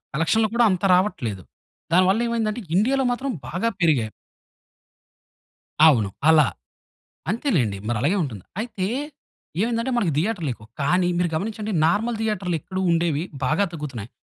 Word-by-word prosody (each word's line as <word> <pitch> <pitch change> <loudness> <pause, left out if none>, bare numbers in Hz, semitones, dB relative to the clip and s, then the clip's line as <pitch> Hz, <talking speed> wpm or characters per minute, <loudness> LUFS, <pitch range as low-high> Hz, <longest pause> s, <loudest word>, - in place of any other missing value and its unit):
కలక్షన్లు 215 +8 +2
కూడా 240 0 +4
అంత 185 +1 -1
రావట్లేదు 120 - 0 0.5
దాని 185 +1 +6
వల్ల 200 +5 +3
ఏమైందంటే 230 -1 -1 0.2
ఇండియాలో 265 +6 +2
మాత్రం 260 +3 -2 0.2
బాగా 180 - -1
పెరిగాయి. 140 - +2 1.8
అవును. 115 -11 +5 0.2
అలా. 155 -3 +6 0.8
అంతేలెండి 175 - 0
మరి 120 - 0
అలాగే 180 +8 +2
ఉంటుంది. 110 -10 -6 0.2
అయితే 220 -5 -3 0.8
ఏమైందంటే 230 +3 0
మనకు 190 -9 +1
థియేటర్లు 180 -3 -1
ఎక్కువ 110 -1 -16
కానీ 175 +5 +2
మీరు 175 -1 +1
గమనించండి 215 +4 -3
నార్మల్ 220 +7 +1
థియేటర్లు 200 -5 -1
ఎక్కడో 190 +4 -5
ఉండేవి 165 -2 +1 0.2
బాగా 195 +10 +2
తగ్గుతున్నాయి. 135 - -6
180 Hz, 130 wpm, -23 LUFS, 150-220 Hz, 1.8 s, దాని